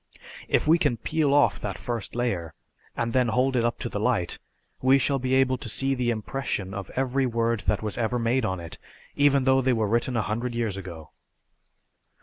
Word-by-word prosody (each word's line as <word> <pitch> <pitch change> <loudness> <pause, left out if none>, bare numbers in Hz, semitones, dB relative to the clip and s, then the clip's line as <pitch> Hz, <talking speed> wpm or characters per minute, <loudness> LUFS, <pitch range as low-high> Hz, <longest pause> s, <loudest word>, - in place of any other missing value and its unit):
"If - - +1
we 165 +2 +5
can 120 - +1
peel 155 +3 0
off 145 0 +4
that - - -4
first 120 -5 -5
layer, 100 -10 -2 0.4
and 115 -1 -1
then 125 -1 +3
hold 130 +4 +1
it 120 - +2
up 120 0 0
to - - -2
the 105 - -4
light, 110 -6 0 0.4
we 130 +1 +5
shall 135 0 +1
be 130 +1 0
able 130 -1 +2
to 115 - -5
see 135 +5 +1
the 125 -2 0
impression 110 -4 -3
of 100 -2 -6
every 130 0 +1
word 115 -1 0
that - - +1
was 105 0 -4
ever 120 +1 0
made 120 +2 +1
on 95 -3 -1
it 85 -1 -9 0.4
even 140 -1 +4
though 130 0 +4
they 130 0 +2
were 110 -2 +1
written 120 +3 0
a 110 - +1
hundred 115 +4 -3
years 115 -4 -1
ago!" 85 -5 -9
120 Hz, 205 wpm, -26 LUFS, 110-130 Hz, 0.4 s, we